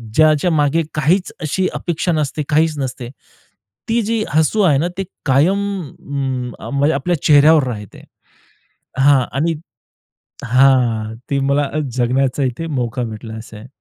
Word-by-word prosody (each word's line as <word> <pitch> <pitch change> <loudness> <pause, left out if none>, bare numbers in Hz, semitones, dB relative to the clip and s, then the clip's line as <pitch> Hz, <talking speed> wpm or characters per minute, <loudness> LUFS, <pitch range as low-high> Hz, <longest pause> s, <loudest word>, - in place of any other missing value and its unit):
ज्याच्या 155 +2 +4
मागे 155 +1 +2
काहीच 165 +6 +1
अशी 185 +5 0
अपेक्षा 175 +1 -2
नसते, 150 -1 -1
काहीच 155 0 +2
नसते. 130 -2 -4 0.8
ती 230 +1 +2
जी 225 0 -1
हसू 160 +8 +2
आहे 160 -8 +4
ना 165 - 0
ते 195 - -1 0.2
कायम 150 +8 +3 0.4
उम्म, 130 -3 -4
अ, - - -8
म्हणजे 145 +3 +1
आपल्या 160 +3 -1
चेहऱ्यावर 150 +1 +6
राहते 105 -5 -7 1.0
हां 135 0 +5 0.2
आणि 165 +4 +1 0.9
हां, 120 -3 +2
ती 140 - 0
मला 140 +1 +1 0.3
जगण्याचा 130 +2 +1
इथे 130 +6 -3
मौका 120 +1 -3
भेटला 110 0 -7
असे 110 -1 -10
आहे. 110 +4 -12
140 Hz, 140 wpm, -18 LUFS, 125-160 Hz, 1.0 s, चेहऱ्यावर